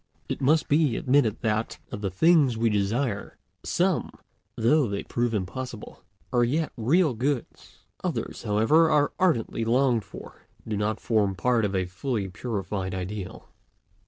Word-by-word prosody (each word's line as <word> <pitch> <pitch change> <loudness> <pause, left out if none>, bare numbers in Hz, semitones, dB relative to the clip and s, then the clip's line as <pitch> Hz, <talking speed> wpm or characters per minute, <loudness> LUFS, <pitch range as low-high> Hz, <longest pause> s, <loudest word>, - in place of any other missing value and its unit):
It - - -4
must 155 +4 +3
be 145 -5 +2
admitted 130 -5 +2
that, 110 -1 -1
of 105 - -5
the 100 - -1
things 140 - +4
we 115 0 +2
desire, 105 +2 -1 0.3
some, - - 0 0.5
though 135 +4 +3
they 100 -1 -3
prove 120 0 -1
impossible, 110 +3 -5 0.3
are 120 -1 +4
yet 155 +7 0
real 145 +6 +2
goods; 130 +2 -4 0.2
others, - - -3
however, 115 +11 +3
as 145 -1 +3
ardently 125 -10 +1
longed 120 -1 +2
for, - - -12 0.3
do 110 - -2
not 105 +1 -1
form 105 -4 +1
part 115 +4 +1
of 100 -1 -2
a 95 -1 +1
fully 100 +3 -3
purified 95 -3 -4
ideal. 95 +1 -6
115 Hz, 145 wpm, -26 LUFS, 105-135 Hz, 0.5 s, things